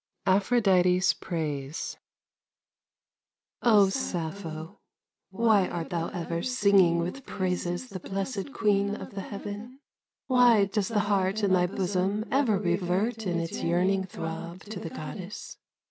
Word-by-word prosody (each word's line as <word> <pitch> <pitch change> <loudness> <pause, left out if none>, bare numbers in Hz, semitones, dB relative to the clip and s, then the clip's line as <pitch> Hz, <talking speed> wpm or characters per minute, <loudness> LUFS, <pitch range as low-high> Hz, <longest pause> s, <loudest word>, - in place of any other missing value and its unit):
APHRODITE'S 190 -3 +4
PRAISE 150 -4 -4 1.7
O 210 -5 +5
Sappho, 170 -4 -4 0.5
why 205 -1 +3
art 170 -2 -5
thou 170 -1 -1
ever 170 -2 -3
Singing 200 -8 +4
with 180 +11 -3
praises 180 +3 -2
the 190 - -6
blessed 195 +6 -4
Queen 200 -3 +1
of - - -8
the 195 - -4
heaven? 205 +6 -7 0.5
Why 245 -5 +5
does 195 0 -1
the 215 -3 +1
heart 200 0 0
in 195 -2 +3
thy 180 -1 +4
bosom 195 +3 -1
Ever 255 -6 +3
revert 190 +4 0
in 175 -1 0
its 165 0 -4
yearning 185 +3 +1
Throb 170 +1 -6
to 210 -2 -7
the 165 - -6
Goddess? 185 +7 -7
190 Hz, 125 wpm, -28 LUFS, 175-210 Hz, 1.7 s, O